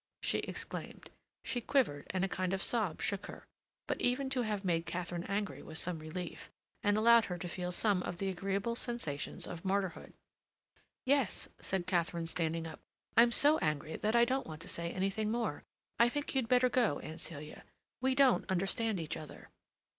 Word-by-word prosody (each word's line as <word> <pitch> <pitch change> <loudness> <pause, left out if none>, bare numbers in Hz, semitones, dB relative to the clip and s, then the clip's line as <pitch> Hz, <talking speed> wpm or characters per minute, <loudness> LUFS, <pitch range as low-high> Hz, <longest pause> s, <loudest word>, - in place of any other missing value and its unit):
she - - +2
exclaimed. - - -6 0.3
She 245 - -1
quivered, 225 - +1
and 185 0 +1
a - - -1
kind 185 0 -1
of 195 - 0
sob 215 -9 0
shook 200 -1 -1
her; - - -10 0.4
but - - -2
even 265 +2 +1
to 260 -2 +1
have 210 -3 -2
made 170 -2 +1
Katharine 175 0 -3
angry 200 +1 -2
was 160 - -6
some 175 -1 0
relief, 160 +2 -6 0.3
and 205 0 +3
allowed 230 +1 +6
her 180 - -4
to 175 - -5
feel 180 +1 -3
some 200 0 +3
of 175 -1 -4
the 195 - -2
agreeable 195 +5 -1
sensations 235 - -2
of 170 -1 -7
martyrdom. 190 -2 -2 0.9
"Yes," 270 -5 +1
said 190 -2 -2
Katharine, 170 -2 0
standing 165 0 -1
up, 165 - -8 0.4
"I'm 235 +1 +7
so 295 +5 +6
angry 155 0 -1
that 215 +2 0
I 235 0 +7
don't 260 +2 -1
want 155 0 -7
to - - -8
say 170 0 -3
anything 195 +3 -1
more. 225 -9 -1 0.4
I 235 +1 +6
think 290 +3 -2
you'd 260 -4 +1
better 250 0 +5
go, 240 - +2
Aunt 160 +1 -8
Celia. 150 -3 -8 0.4
We 260 0 +2
don't 270 -5 +4
understand 195 +3 +1
each 160 -2 -3
other." 155 - -10
195 Hz, 185 wpm, -34 LUFS, 170-235 Hz, 0.9 s, I'm